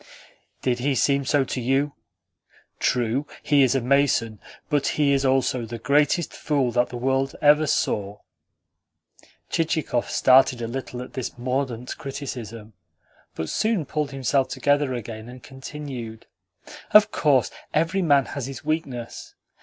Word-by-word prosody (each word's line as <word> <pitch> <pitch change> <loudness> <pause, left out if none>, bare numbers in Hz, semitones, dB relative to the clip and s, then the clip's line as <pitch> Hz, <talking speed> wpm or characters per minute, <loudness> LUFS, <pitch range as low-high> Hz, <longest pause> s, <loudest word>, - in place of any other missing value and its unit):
"Did 125 -1 0
he 135 +2 0
seem 140 +2 +2
so 140 +1 +2
to 130 0 -4
you? 135 +4 +1 0.9
True, 125 +4 0 0.2
he 145 -1 +4
is 130 -1 +3
a 135 - +1
mason, 125 -4 +1 0.3
but 145 -2 +1
he 145 -2 +3
is 135 0 +1
also 130 -2 +1
the 115 +1 -6
greatest 145 +7 +1
fool 140 -5 0
that 120 +1 +1
the 120 - -6
world 135 +2 0
ever 150 +1 +5
saw." 100 -6 -1 1.3
Chichikov 160 -6 0
started 130 -1 +4
a 115 - -3
little 125 0 -5
at - - -13
this 130 -2 -5
mordant 125 -1 -3
criticism, 115 -6 -7 0.6
but 80 - -4
soon 215 - 0
pulled 150 -1 -2
himself 135 0 0
together 145 0 +1
again, 115 -1 -7
and 125 0 -12
continued: 130 -4 -8 0.6
"Of 210 0 +6
course, 140 -6 +2 0.2
every 165 +5 +1
man 145 -6 +4
has 135 0 -5
his 135 0 -8
weakness. 140 -7 -4
135 Hz, 140 wpm, -24 LUFS, 120-145 Hz, 1.3 s, Of